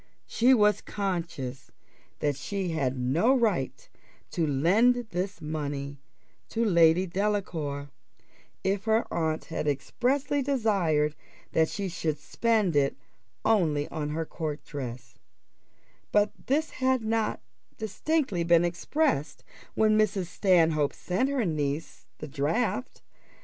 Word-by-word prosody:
She 255 +3 +4
was 210 -2 +3
conscious 165 -10 -4 0.5
that 145 -1 +1
she 190 +6 -3
had 135 -5 -1
no 165 - +3
right 205 - 0 0.4
to 165 -2 0
lend 185 - +4 0.2
this 185 +3 -3
money 145 -2 -4 0.5
to 230 +1 0
Lady 170 -2 +5
Delacour, 170 -8 -2 0.7
if 195 +1 0
her 220 +1 +2
aunt 160 -2 -1
had 160 - -3
expressly 260 - 0
desired 195 - +1 0.4
that 160 0 +3
she 200 -1 -3
should 165 -3 -2
spend 210 +2 +1
it 140 -1 +2 0.5
only 160 -10 +2
on 150 -2 -3
her 160 +2 -2
court 155 -2 -5
dress; 125 -5 -7 0.9
but 210 0 +3 0.2
this 305 +4 +1
had 260 -2 +1
not 225 0 0 0.4
distinctly 220 - -1
been 170 0 +4
expressed 175 - -1 0.3
when 215 0 +4
Mrs. 200 -3 +1
Stanhope 165 -5 +2
sent 190 +9 -1
her 270 -5 0
niece 150 -2 -3
the - - -7
draft. 145 - -1
175 Hz, 120 wpm, -28 LUFS, 150-215 Hz, 0.9 s, Lady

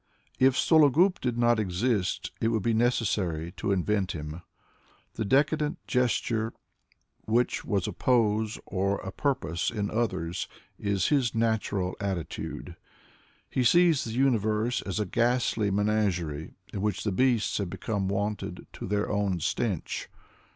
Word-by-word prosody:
If 130 0 +5
Sologub 160 +5 +4
did 120 -2 -1
not 120 -1 +3
exist, 100 +1 0
it 115 - +2
would 110 -3 0
be 115 - +2
necessary 100 -8 0
to 100 - -1
invent 95 0 0
him. 75 +2 -6 0.7
The - - -2
decadent 150 +6 +2
gesture, 120 -2 0 0.7
which 120 +2 +1
was 100 -5 0
a - - -3
pose 110 -3 +1
or 100 +1 0
a 95 - -6
purpose 95 - -1
in 105 -3 -3
others, 95 -7 -1 0.3
is 100 -3 0
bis 135 -6 +2
natural 105 -5 0
attitude. 95 -5 -4 0.7
He 130 - 0
sees 170 +1 +5
the 115 - -5
universe 115 -2 +1
as 100 +1 -3
a 105 - 0
ghastly 115 0 +1
menagerie 95 -6 0 0.2
in 100 - -3
which 105 -2 -1
the 105 - 0
beasts 120 +1 +2
have 100 -3 -2
become 100 +1 -2
wonted 100 +1 -3
to - - -6
their 105 +1 0
own 100 -3 0
stench. 95 +1 -2
105 Hz, 135 wpm, -28 LUFS, 95-120 Hz, 0.7 s, If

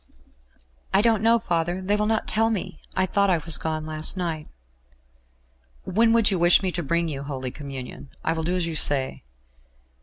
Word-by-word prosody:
"I 200 - +4
don't 225 -3 +3
know, 230 +1 +4
father. 175 -4 -1
They 195 +2 0
will 210 0 0
not 220 0 0
tell 225 +1 +2
me. 190 -4 -4
I 185 - +2
thought 200 +1 +1
I 180 - +3
was 160 0 +1
gone 155 -1 -3
last 155 +3 +1
night." 165 -4 -3 1.4
"When 225 +5 +2
would 225 -2 +4
you 190 - 0
wish 175 +3 +5
me 185 - 0
to 175 +1 -3
bring 170 +3 0
you 140 -4 -4
Holy 130 -3 -5
Communion? 135 -2 -8
I 160 - +1
will 160 -1 -3
do 175 +3 -1
as 180 -2 0
you 165 -1 -4
say." 140 -3 +1
175 Hz, 190 wpm, -24 LUFS, 155-200 Hz, 1.4 s, wish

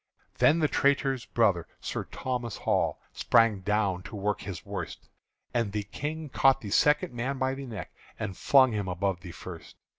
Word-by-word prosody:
Then 155 - +5
the 155 -2 +3
traitor's 135 -3 +1
brother, 100 -8 +2
Sir - - -4
Thomas 125 -3 -4
Hall, - - 0
Sprang 115 -3 +3
down 100 -2 0
to 100 +4 -9
work 105 +1 -1
his 100 -3 -7
worst; - - -6 0.5
And 115 -4 0
the 105 -1 -1
King 155 +9 -5
caught 135 0 +4
the 100 - -6
second 150 +3 +3
man 125 +3 -2
by 130 0 0
the 135 0 -6
neck 110 -7 -7 0.2
And 95 - -4
flung 130 +3 +5
him 105 -3 -2
above 90 0 -1
the 90 - -8
first. 85 -1 -10
115 Hz, 175 wpm, -28 LUFS, 100-135 Hz, 0.5 s, Then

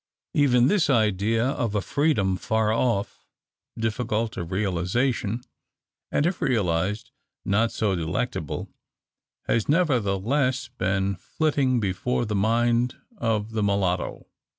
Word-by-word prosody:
Even 125 -4 +4
this 190 0 +3
idea 110 -1 +2
of 125 -5 -1
a - - +3
freedom 110 -9 +1
far 110 +3 0
off, 115 -3 -1 0.5
difficult 115 0 -1
of 85 -1 -5
realisation, 105 +5 0 0.7
and 145 - +2
if 175 +1 -1
realised 100 - 0 0.3
not 110 +4 +2
so 105 -4 0
delectable, 80 -2 -3 0.8
has 115 +1 0
nevertheless 130 - +1
been 95 0 0
flitting 140 -5 0
before 105 +5 -1
the 105 - -3
mind 120 +4 +2 0.2
of 110 -1 0
the 110 -1 -1
mulatto. 100 -3 0
110 Hz, 110 wpm, -25 LUFS, 100-125 Hz, 0.8 s, Even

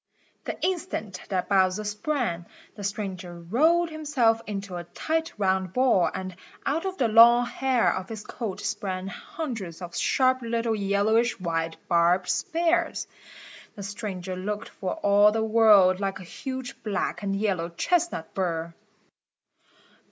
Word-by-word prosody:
The - - -5
instant 335 - -2
that 185 -3 -1
Bowser 190 0 +2
sprang, 210 - -2 0.3
the 205 - -9
stranger 190 -3 -4
rolled 320 - +2
himself 270 -8 +1
into 195 -3 -5
a 175 - -5
tight 320 - -2
round 190 -2 0
ball 250 -9 +3
and 185 -1 -6 0.3
out 320 +7 0
of 380 0 -4
the 245 - +2
long 235 +2 +7
hair 260 -1 +1
of 185 0 -5
his 220 -2 -6
coat 220 -6 -5
sprang 190 -2 -3
hundreds 215 - -6
of 175 -2 -8
sharp 255 -1 +2
little 230 -1 -1
yellowish 210 +3 +1
white 165 -2 -2
barbed 175 +2 +3
spears. 340 +1 0 0.7
The 200 - -7
stranger 195 -3 -5
looked 205 +3 -4
for 190 - -4
all 205 +1 +5
the 220 +1 0
world 215 -4 +5
like 195 -1 -2
a - - -9
huge 260 +7 -7
black 210 -1 -2
and 195 -1 -1
yellow 195 -5 -1
chestnut 320 - -1
burr. 170 -3 -2
205 Hz, 140 wpm, -26 LUFS, 185-245 Hz, 0.7 s, long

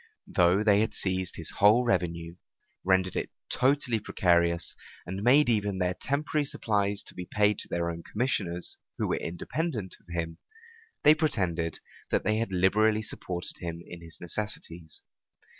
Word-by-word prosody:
Though 90 +3 +3
they 105 -2 +5
had 110 - -1
seized 95 -1 -1
his 85 - -5
whole 110 +5 +5
revenue, 85 -5 -1 0.5
rendered 95 -1 +2
it - - -2 0.2
totally 130 -3 +2
precarious, 85 -4 +2 0.3
and 95 +2 -4
made 135 +7 +5
even 105 -4 +1
their 90 -1 +1
temporary 150 - -1
supplies 100 -5 0
be 90 -1 -6
paid 105 0 +2
to - - -6
their 85 0 -1
own 85 0 -6
commissioners, 95 -6 -1 0.2
who - - 0
were - - 0
independent 105 - -3
of 85 - -17
him, 80 -1 -3 0.6
they 150 - +9
pretended 90 - -1 0.3
that - - +1
they 110 0 +1
had 115 -2 -1
liberally 105 +4 +3
supported 90 -4 -4
him 85 -1 -5
in 85 -1 -10
his 85 0 -4
necessities. 85 -3 -4
95 Hz, 150 wpm, -29 LUFS, 85-110 Hz, 0.6 s, they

